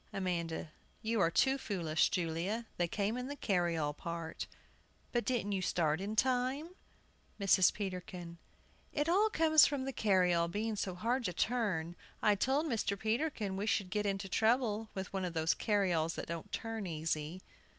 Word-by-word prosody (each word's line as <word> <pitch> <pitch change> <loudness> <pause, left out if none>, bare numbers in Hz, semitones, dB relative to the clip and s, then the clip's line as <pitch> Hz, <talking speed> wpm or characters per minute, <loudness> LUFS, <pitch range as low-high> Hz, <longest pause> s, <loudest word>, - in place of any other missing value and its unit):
AMANDA. 170 -4 -2 0.3
You 225 0 0
are 165 - +4
too 265 +10 +3
foolish, 165 - +1
Julia. 180 +6 -1
They 175 - +1
came 205 +6 -1
in 250 0 -4
the 285 - -5
carryall 170 - 0
part. 170 0 -5 0.6
But 240 -1 0
didn't 235 -5 0
you 195 -2 0
start 160 -2 +1
in 205 +2 -3
time? 260 +6 +1 0.7
MRS. 195 -2 +5
PETERKIN. 180 -3 -6 0.5
It 295 +1 0
all 400 +6 +4
comes 315 -4 +6
from 280 -2 -2
the 270 - -3
carryall 180 -6 +3
being 215 +5 -2
so 190 -3 -3
hard 240 +7 0
to 180 - -1
turn. 185 -7 0 0.2
I 210 - +4
told 265 +9 +1
Mr. 225 -7 -1
Peterkin 220 -2 -1
we 205 +2 -2
should 200 -3 0
get 210 +1 0
into 195 0 -2
trouble 220 +1 +1
with 190 0 -5
one 190 -1 -1
of 175 -2 -3
those 160 0 +2
carryalls 180 -6 +1
that - - -4
don't 170 -1 -6
turn 225 -3 -3
easy. 160 +1 -2
200 Hz, 165 wpm, -34 LUFS, 170-230 Hz, 0.7 s, comes